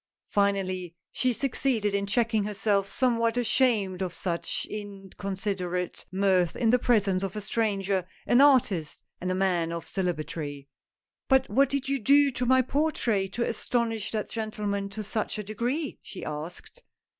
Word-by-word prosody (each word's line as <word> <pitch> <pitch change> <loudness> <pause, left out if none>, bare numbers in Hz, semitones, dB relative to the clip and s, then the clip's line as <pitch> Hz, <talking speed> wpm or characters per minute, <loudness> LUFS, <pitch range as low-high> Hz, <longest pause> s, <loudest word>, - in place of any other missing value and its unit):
Finally 185 -3 0 0.2
she 255 - +1
succeeded 240 -4 0
in 200 0 0
checking 220 0 +2
herself, 205 -1 0
somewhat 230 0 +1
ashamed 220 -6 +2
of 180 -2 -3
such 170 -2 -2
incon 200 -2 -8 0.2
siderate 180 -3 -3
mirth 185 -2 +2
in 230 - +1
the 250 +2 +5
presence 200 -6 +2
of 195 0 -3
a 210 - -3
stranger, 200 -3 0 0.2
an 245 - +5
artist 220 - +3 0.2
and 180 - -2
a 185 - 0
man 180 -3 +1
of 170 0 -5
celebrity. 155 -6 -3 0.6
"But 265 -1 +3
what 275 +2 +4
did 275 -1 -2
you 275 0 0
do 280 +4 +5
to 245 0 -2
my 260 +1 +5
portrait 245 -9 0
to 235 - 0
astonish 230 -2 -1
that 215 -2 -2
gentleman 210 -3 -2
to 215 +2 -6
such 215 +1 -2
a 210 - -3
degree? 245 +9 -3
" - - -53
she 190 - -8
asked. 155 - -7
205 Hz, 155 wpm, -27 LUFS, 185-240 Hz, 0.6 s, the